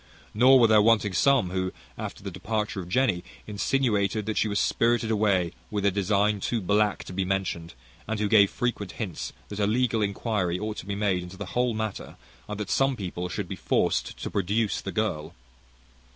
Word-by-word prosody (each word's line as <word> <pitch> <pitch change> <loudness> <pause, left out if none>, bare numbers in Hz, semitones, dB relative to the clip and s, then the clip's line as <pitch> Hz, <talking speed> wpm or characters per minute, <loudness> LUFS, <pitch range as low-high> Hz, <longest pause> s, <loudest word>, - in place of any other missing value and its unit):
Nor 130 +4 +6
were 120 - +6
there 110 -1 +6
wanting 105 -2 +3
some, 120 - +3
who, 95 0 -1 0.2
after - - -7
the - - -5
departure 105 -2 -3
of 90 -2 -7
Jenny, 105 -5 +1 0.2
insinuated 105 -2 0
that 110 -1 -2
she - - +2
was 100 -1 0
spirited 115 -1 +1
away 100 -5 +2 0.2
with 105 -1 -2
a 100 - +4
design 100 +2 +1
too 115 +4 -1
black 105 +1 +1
to - - -9
be 95 +1 0
mentioned, 95 -3 -2 0.3
and 110 0 -2
who 105 - +1
gave 100 -2 +6
frequent 120 -6 -3
hints 95 -8 -5 0.2
that 105 - -6
a 100 - +2
legal 115 0 +1
inquiry 100 -3 -1
ought 105 +2 -4
to - - -7
be 100 - -2
made 100 -3 +1
into 90 +1 -9
the 100 - -5
whole 125 -2 +1
matter, 110 -2 -4 0.3
and 105 0 -5
that 105 - -4
some 135 0 +2
people 90 -4 -4
should - - -4
be - - -5
forced - - 0
to - - -4
produce 105 +3 0
the 100 - -5
girl. 95 -6 -2
105 Hz, 195 wpm, -26 LUFS, 95-110 Hz, 0.3 s, Nor